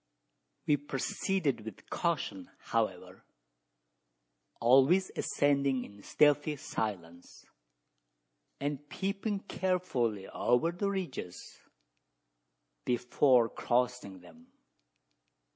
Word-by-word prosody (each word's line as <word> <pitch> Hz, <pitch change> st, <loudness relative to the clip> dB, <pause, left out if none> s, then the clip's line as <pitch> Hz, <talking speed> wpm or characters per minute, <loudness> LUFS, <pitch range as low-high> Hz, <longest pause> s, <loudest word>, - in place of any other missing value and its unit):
We 150 Hz, -, +3 dB
proceeded 145 Hz, -, -1 dB
with 110 Hz, -3 st, -11 dB
caution, -, -, -2 dB
however: -, -, -3 dB, 1.4 s
always 135 Hz, +10 st, +5 dB
ascending 140 Hz, -3 st, +1 dB
in 100 Hz, 0 st, -14 dB
stealthy 145 Hz, +5 st, +3 dB
silence, 90 Hz, -, -5 dB, 1.1 s
and 145 Hz, 0 st, -4 dB
peeping 195 Hz, +2 st, -2 dB
carefully 135 Hz, -, -1 dB
over 125 Hz, +8 st, +1 dB
the 200 Hz, +3 st, -2 dB
ridges 175 Hz, -, -5 dB, 1.2 s
before 125 Hz, 0 st, +3 dB
crossing 120 Hz, -6 st, -1 dB
them. 245 Hz, -, -17 dB
135 Hz, 75 wpm, -31 LUFS, 120-175 Hz, 1.4 s, always